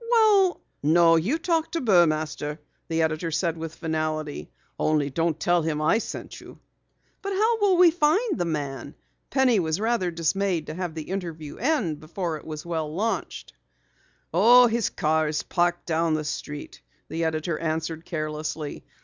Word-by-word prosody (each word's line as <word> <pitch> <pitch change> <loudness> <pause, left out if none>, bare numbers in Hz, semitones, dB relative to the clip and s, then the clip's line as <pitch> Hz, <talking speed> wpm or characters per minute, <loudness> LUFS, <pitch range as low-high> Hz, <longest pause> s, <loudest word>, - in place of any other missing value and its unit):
"Well 425 -6 +4
" - - -47 0.2
"No, 165 -1 +6
you 195 - +1
talk 330 -1 0
to 335 - 0
Burmaster," 155 - +2 0.3
the 165 -1 +1
editor 160 +1 -1
said 165 +1 0
with 165 0 -6
finality. 155 - -3 0.3
"Only 150 -2 +1
don't 165 +1 0
tell 175 0 +2
him 155 -1 -1
I 155 +8 +3
sent - - -7
you." - - -13 0.6
"But 395 0 -3
how 445 +4 +2
will 390 -3 +4
we 355 -1 +7
find 345 +6 +2
the 175 - +1
man?" 145 -3 -4 0.3
Penny 255 -5 +3
was 160 0 -1
rather 225 -4 +1
dismayed 170 +1 0
to 155 - -6
have 175 -1 -4
the 160 - -4
interview 165 -6 -5
end 225 - 0
before 165 +1 -4
it - - -14
was 155 0 -7
well 160 -3 -3
launched. 215 +8 -3 0.8
"Oh, 245 +2 +7
his 235 -1 +1
car 155 -2 +1
is 150 0 -2
parked 175 0 0
down 165 -1 +1
the 155 - -2
street," 150 0 -6 0.3
the 165 +1 -3
editor 160 0 -1
answered 160 0 -3
carelessly. 155 -2 -4
165 Hz, 165 wpm, -25 LUFS, 155-225 Hz, 0.8 s, we